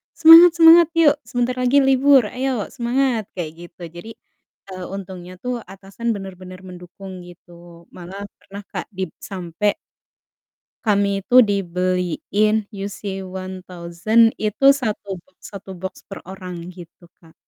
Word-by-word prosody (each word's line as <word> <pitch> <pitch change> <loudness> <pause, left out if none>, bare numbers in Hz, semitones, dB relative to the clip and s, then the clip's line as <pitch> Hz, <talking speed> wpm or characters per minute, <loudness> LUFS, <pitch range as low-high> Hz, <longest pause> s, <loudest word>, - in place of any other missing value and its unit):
"Semangat 335 +1 +9
semangat! 335 0 +7
Yuk, 310 -3 +5
sebentar 245 0 -1
lagi 260 +3 +3
libur, 270 0 +4
ayo 255 -4 -3
semangat!" 240 -2 -1
Kayak 170 -4 -5 0.2
gitu. 175 - -23
Jadi, 175 +6 -11 0.6
eee, 185 -1 -7
untungnya 185 -2 -9
tuh 250 -1 -3
atasan 200 +4 -5
bener-bener 185 -2 -10
mendukung 185 +1 -11
gitu, 175 -1 -16
malah 185 +3 -9 0.2
pernah, 200 +1 -11
Kak, - - -5
dib 185 -3 -4
sampai 190 +1 -3 1.1
kami 200 -2 0
itu 250 +5 +5
dibeliin 195 +1 0
UC-1000 190 +1 -2
itu 215 +5 -2
satu 210 -6 -4
boks 280 - -34
satu 195 0 -9
boks 190 +1 -8
per 195 - -10
orang 185 -2 -8 0.2
gitu, 175 -1 -14 0.2
Kak. 160 -1 -19
195 Hz, 125 wpm, -20 LUFS, 185-240 Hz, 1.1 s, Semangat